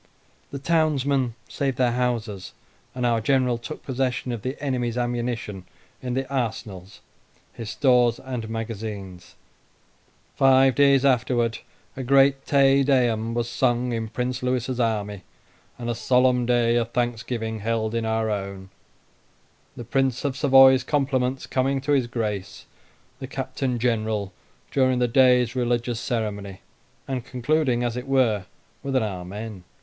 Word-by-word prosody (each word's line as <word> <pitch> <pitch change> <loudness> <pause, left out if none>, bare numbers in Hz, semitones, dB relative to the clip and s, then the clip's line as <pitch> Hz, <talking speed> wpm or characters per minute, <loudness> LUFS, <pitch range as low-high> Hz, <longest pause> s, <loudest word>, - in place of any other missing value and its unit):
The 140 - -6
townsmen 140 -5 +1
saved 135 -3 -2
their 125 -2 +2
houses, 115 -6 -2 0.4
and 125 -1 -1
our 115 -2 +2
General 125 0 +1
took 155 +6 -8
possession 130 -1 -2
of 115 -3 -4
the 130 +5 -4
enemy's 125 -4 -2
ammunition 120 -5 -3 0.4
in 125 -1 -3
the 135 0 -2
arsenals, 110 -7 -4 0.5
his 115 -3 -7
stores, 125 -2 +3
and 125 -4 -5
magazines. 105 -5 -6 1.0
Five 135 0 +5
days 140 -1 +4
afterwards 120 -3 +1 0.4
a 135 - -5
great 135 +1 +3
"Te 140 -1 +4
Deum" 120 -4 +1
was 120 -1 -1
sung 120 0 0
in 115 -1 -2
Prince 125 +3 -3
Lewis's 125 0 -1
army, 105 -4 -1 0.6
and 120 - -6
a 120 - 0
solemn 125 +1 +2
day 120 -1 +3
of 115 -1 0
thanksgiving 115 -2 -2
held 110 +1 -1
in 115 0 -1
our 110 0 0
own; 100 -2 -5 1.1
the 120 - -6
Prince 135 +1 0
of 140 -2 -1
Savoy's 135 -2 +6
compliments 135 -2 0
coming 135 +1 0
to 135 +2 -3
his 135 -4 +2
Grace 105 -5 -4 0.5
the 130 - -6
Captain 130 -1 -3
General 110 -4 -1 0.4
during 130 -2 +2
the 125 0 +2
day's 125 -1 +4
religious 120 -1 -1
ceremony, 105 -6 -4 0.5
and 130 -3 -3
concluding, 130 0 0
as 120 -1 -1
it 125 +2 -5
were, 120 -8 +2 0.3
with 135 -1 -3
an 130 - +3
Amen. 100 +1 -6
120 Hz, 140 wpm, -24 LUFS, 115-130 Hz, 1.1 s, Savoy's